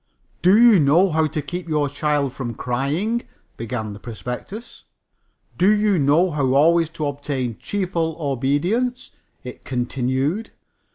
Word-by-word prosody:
"Do 190 +5 +5
you 235 -5 +7
know 165 +6 +4
how 160 0 +2
to 150 0 -4
keep 180 0 -6
the 150 -2 +1
child 145 -2 -1
from 120 -5 -5
crying?" 150 - -1 0.3
began 110 -2 -4
the 100 - -10
prospectus. 125 - -8 0.7
"Do 185 +3 +5
you 210 -3 +2
know 150 +6 +3
how 135 -3 0
always 165 +3 +4
to 155 - -2
obtain 140 -4 -3
cheerful 175 -5 -2
obedience?" 155 - -1 0.3
it 125 - -9
continued. 130 - -2
150 Hz, 130 wpm, -21 LUFS, 130-180 Hz, 0.7 s, you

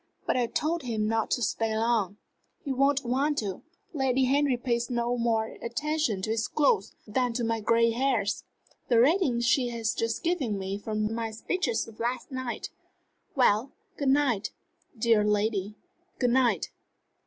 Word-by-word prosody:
"But - - +1
I 245 -2 +1
told 325 +7 -1
him 220 -5 -1
not 225 0 0
to 245 - 0
stay 220 +1 0
long." 220 -3 +1 0.5
"He 275 - -1
won't 275 +1 +2
want 275 +5 +1
to. 195 -4 -3 0.3
Lady 265 -3 +1
Henry 275 0 +2
pays 240 -1 -1
no 240 0 0
more 225 -2 -1
attention 240 -4 -1
to 215 - -1
his 225 0 0
cloth 365 +9 +1
than 245 +3 0
to 240 +1 -2
my 225 0 0
gray 230 +2 +3
hairs. 235 -4 0 0.4
The 235 -2 +4
rating 275 -2 +3
she 255 +1 +3
has 230 -1 -1
just 230 0 -2
given 285 - 0
me 195 +1 -4
for 215 +1 -5
my 225 +2 -1
speech 225 +12 -2
of 225 - -2
last 245 +4 -2
night! 260 -2 -4 0.6
Well, 250 -1 +3 0.2
good 280 -4 0
night, 265 -7 +2 0.5
dear 225 -1 +3
lady 210 -1 0 0.4
good 245 -2 +2
night. 240 -8 +2
235 Hz, 160 wpm, -28 LUFS, 220-265 Hz, 0.6 s, The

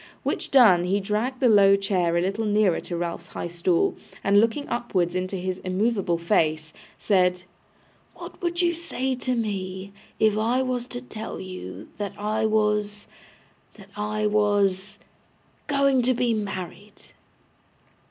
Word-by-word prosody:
which - - -2
done, 215 -10 +6
he 195 +3 +1
dragged 215 +6 -2
the 260 - +4
low 200 -3 +6
chair 185 -4 0
a - - +2
little 195 +5 -1
nearer 205 -4 +2
to 175 - -5
Ralph's 170 0 -4
high - - -6
stool, 170 0 +1 0.3
and 200 +1 +5
looking 230 +6 +1
upwards 190 -8 -1
into 185 +1 -2
his 185 0 -3
immovable 190 -1 0
face, 160 -3 0 0.2
said, 180 -3 +2 0.7
'What - - -11
would 345 0 0
you 345 -1 +2
say 265 -6 -3
to 255 0 -2
me, 195 -3 -4 0.3
if 215 -1 +3
I 240 +4 +1
was 250 -1 -2
to 245 -1 -6
tell 220 -3 -7
you 105 - -8
that 205 -2 -4
I 215 +1 0
was 210 -1 0 0.7
that 200 -2 -15
I 210 0 -2
was 205 -1 +1 0.7
going 275 -2 +3
to 255 +1 +2
be 240 -1 +1
married? 200 0 -6
205 Hz, 145 wpm, -25 LUFS, 185-230 Hz, 0.7 s, done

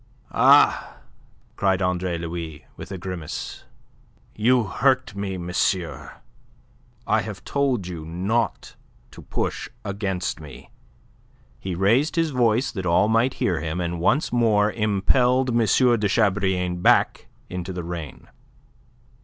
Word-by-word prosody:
"Ah!" - - +4 0.6
cried 95 -2 +1
Andre 90 -2 -1
Louis, 85 -2 -6
with - - -10
a 95 - -4
grimace. 90 -4 -6 0.7
"You 120 +3 +3
hurt 130 +3 +1
me, 100 -1 -3
monsieur. 90 0 -2 0.9
I - - +2
have - - -8
told 135 -8 0
you 85 -3 -6
not 95 +9 -2 0.4
to - - -12
push - - -3 0.2
against 100 -4 -3
me." 75 -3 -12 0.9
He 95 -2 -4
raised 115 - +2
his 165 -2 +1
voice 120 0 +2
that 95 -4 -4
all 90 +5 +3
might 115 +3 +2
hear 85 -4 0
him, 80 +2 -3
and 85 -1 -3
once 135 - +1
more 105 -3 +3
impelled 125 +5 +2
M. 120 - +1
de 115 -1 +3
Chabrillane 95 -4 +1
back - - +3 0.2
into 90 +1 -5
the 90 -1 -5
rain. 80 -7 -7
95 Hz, 125 wpm, -23 LUFS, 90-115 Hz, 0.9 s, Ah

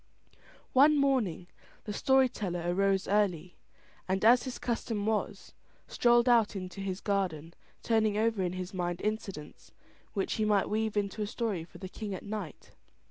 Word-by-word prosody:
One 295 +3 +6
morning 255 - +1 0.4
the 210 - -5
story 265 +4 +4
teller 180 -7 -4
arose 195 +2 +1
early, 185 -4 0 0.5
and 190 +3 0
as 245 +3 +6
his 255 - -5
custom 225 -3 -2
was, 220 -1 -2 0.3
strolled 240 0 +3
out 230 -4 +4
into 185 +1 -6
his 190 0 -4
garden 175 -6 -2 0.3
turning 220 -2 +2
over 220 -2 +1
in 180 -1 -1
his 185 0 -6
mind 175 -1 -2
incidents 200 -8 -5 0.4
which 195 -3 -1
he - - +3
might 210 -2 +2
weave 220 0 -1
into 205 +1 -1
a 210 - -1
story 215 -6 -2
for - - -15
the 190 - -7
king 200 +1 -6
at - - -8
night. 205 -7 -7
205 Hz, 160 wpm, -30 LUFS, 185-225 Hz, 0.5 s, One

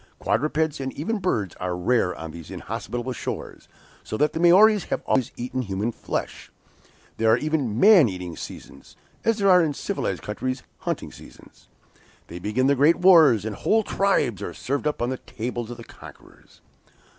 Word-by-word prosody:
Quadrupeds, 150 +3 0
and 135 -1 -3
even 205 +9 -3
birds, 110 - -1
are 90 -1 -3
rare 90 0 +1
on 80 0 -7
these 85 0 -11
inhospitable 120 +1 -5
shores, - - -6 0.4
so 110 - -5
that 150 +4 +1
the - - -3
Maories 195 +4 +6
have - - -3
always 130 -3 +1
eaten 125 +1 -3
human 105 +1 -2
flesh. - - -5 0.7
There 110 0 +2
are 110 - +5
even 135 -6 -1
'man 195 - +7
eating 90 -3 -6
seasons,' - - -11 0.3
as 225 -1 +1
there 200 -2 +3
are 180 -1 +7
in 150 -3 -1
civilized - - -3
countries 130 +5 -4 0.2
hunting - - -4
seasons. - - -16 0.6
Then 85 +1 -8
begin 110 +7 0
the 140 - +4
great 145 +5 +4
wars, 160 - +6
and 110 -2 -4
whole 220 +1 +1
tribes 195 - 0
are 85 - -6
served 140 +3 -2
up 150 -5 -2
on 120 - -1
the 130 - -4
tables 120 -1 -5
of 120 - -7
the 115 - -10
conquerors." - - -16
130 Hz, 175 wpm, -24 LUFS, 110-160 Hz, 0.7 s, man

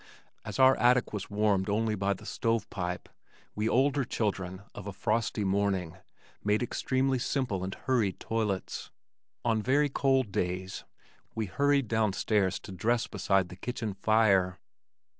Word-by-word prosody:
As 105 -3 -6
our 130 0 +7
attic 125 -1 +3
was 105 -2 -4
warmed 100 -2 +1
only 110 +1 +1
by 100 -1 0
the - - -13
stove 115 -2 -1
pipe, 90 -2 -4 0.5
we 105 +2 0
older 140 +2 +3
children 95 -5 -2
of 105 - -8
a 100 - -5
frosty 110 +1 0
morning 95 -3 0 0.5
made 105 +3 +2
extremely 130 +2 0
simple 120 -8 -1
and 95 +1 -4
hurried 115 -7 0
toilets. 105 -4 -2 0.6
On 115 -2 +2
very 145 +5 +2
cold 135 -5 +1
days 90 0 -3 0.5
we 110 - -1
hurried 140 +6 +2
down 110 -2 +1
stairs 100 -2 +1
to 100 - -10
dress 115 +5 +1
beside 95 -2 +1
the 90 - -9
kitchen 110 +1 -4
fire. 100 -3 +3
105 Hz, 145 wpm, -29 LUFS, 95-120 Hz, 0.6 s, our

